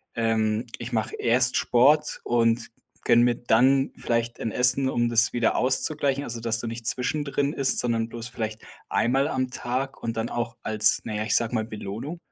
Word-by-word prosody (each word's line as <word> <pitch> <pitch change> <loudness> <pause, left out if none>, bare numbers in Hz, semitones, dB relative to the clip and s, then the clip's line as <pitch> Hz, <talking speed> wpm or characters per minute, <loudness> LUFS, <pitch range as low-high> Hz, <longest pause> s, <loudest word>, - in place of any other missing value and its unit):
ähm, 110 0 0
ich 120 +1 -7
mache 110 -1 -2
erst 125 +1 +3
Sport 145 +5 +2
und 115 -1 +1 0.4
gönne 120 -1 +5
mir 120 -1 +2
dann 130 +4 +2
vielleicht 115 0 -2
ein 115 - -3
Essen, 125 +3 +3
um 120 -2 0
das 115 0 +4
wieder 120 -2 +1
auszugleichen.“ 135 +2 +1
Also, 115 -1 -6
dass 115 0 +1
du 120 - -4
nicht 115 0 -7
zwischendrin 140 +2 -1
isst, 135 -1 +3
sondern 115 -1 -1
bloß, 115 0 -6
vielleicht 110 -2 -5 0.3
1 120 - 0
Mal 135 +2 +2
am 130 -3 -2
Tag 130 +2 -4
und 115 -1 -4
dann 115 +1 -2
auch 120 0 -4
als 110 0 +2
na 110 - -4
ja, 105 - -2
ich 110 - 0
sag 115 +1 0
mal, 110 - 0
Belohnung? 110 - -7
120 Hz, 190 wpm, -24 LUFS, 115-130 Hz, 0.4 s, gönne